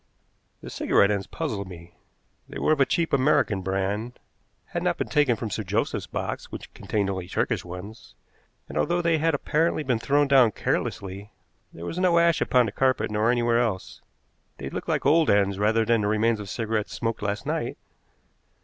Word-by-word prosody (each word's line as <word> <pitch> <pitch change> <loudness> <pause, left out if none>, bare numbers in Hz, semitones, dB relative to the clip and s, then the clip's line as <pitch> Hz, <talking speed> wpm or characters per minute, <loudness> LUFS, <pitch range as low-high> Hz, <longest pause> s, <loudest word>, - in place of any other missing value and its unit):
The - - -9
cigarette 100 - +3
ends 100 -2 -2
puzzled 110 - -4
me. 85 -1 -12 0.6
They - - -7
were - - +1
of 155 - +2
a 135 - +4
cheap 170 -2 0
American 130 -7 +2
brand, 95 +5 -2 0.5
had - - -3
not - - 0
been - - -3
taken 145 -5 +3
from 110 -1 -5
Sir 110 - -2
Joseph's 105 +3 -2
box, - - -5
which - - -9
contained 105 -2 -2
only 95 -2 -3
Turkish - - -1
ones, 90 +5 -10 0.5
and, - - -3
although 175 0 +1
they 165 -2 +2
had 165 0 +2
apparently 155 +2 0
been 125 -5 0
thrown 145 +4 +2
down 130 -6 +5
carelessly, 100 +1 -3 0.4
there 85 - -9
was 170 - -4
no 180 -2 +3
ash 170 -1 +3
upon 125 -1 +3
the 105 - -3
carpet 130 0 +1
nor 105 +2 +1
anywhere 120 -1 +2
else. 110 -6 -2 0.6
They - - -6
looked - - -5
like - - 0
old 160 +1 +4
ends 100 -1 +2
rather 110 +2 +2
than 115 -1 +2
the 105 - 0
remains 110 +1 +2
of 100 -1 -7
cigarettes 110 0 -2
smoked 115 -1 -3
last 100 0 -2
night. - - -2
110 Hz, 185 wpm, -25 LUFS, 100-140 Hz, 0.6 s, down